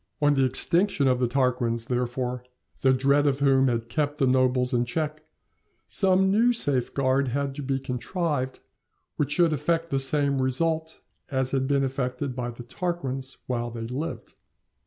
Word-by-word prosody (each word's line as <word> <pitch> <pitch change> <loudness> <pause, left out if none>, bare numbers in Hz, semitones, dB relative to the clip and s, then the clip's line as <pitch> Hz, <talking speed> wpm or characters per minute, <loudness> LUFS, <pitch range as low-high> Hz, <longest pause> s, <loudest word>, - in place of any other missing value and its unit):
On 145 -1 +4
the 135 -2 +3
extinction 170 +4 +2
of 125 -1 +2
the 125 - +2
Tarquins, 120 -3 0
therefore, 125 0 -2 0.4
the 130 - +4
dread 140 +3 +3
of 135 -2 +2
whom 135 -1 +3
had 115 -2 -1
kept 145 +3 -1
the 140 - +2
nobles 130 0 +2
in 120 -1 +2
check, 155 +4 -3 0.6
some 190 -1 +3
new 235 +4 +4
safeguard 135 - +1
had 140 +2 -2
to 145 - -6
be 135 -1 -1
contrived, 135 +1 -3 0.6
which 145 -1 0
should 170 -3 +3
effect 165 +3 -1
the 135 - +1
same 140 0 +1
result 160 +5 -1 0.3
as 130 -1 0
had 135 -1 0
been 140 0 +2
effected 130 0 -3
by 125 -1 -3
the 120 0 -9
Tarquins 135 -3 -4
while 120 -1 -2
they 115 -1 -7
lived. 140 +8 -5
135 Hz, 160 wpm, -26 LUFS, 125-150 Hz, 0.6 s, On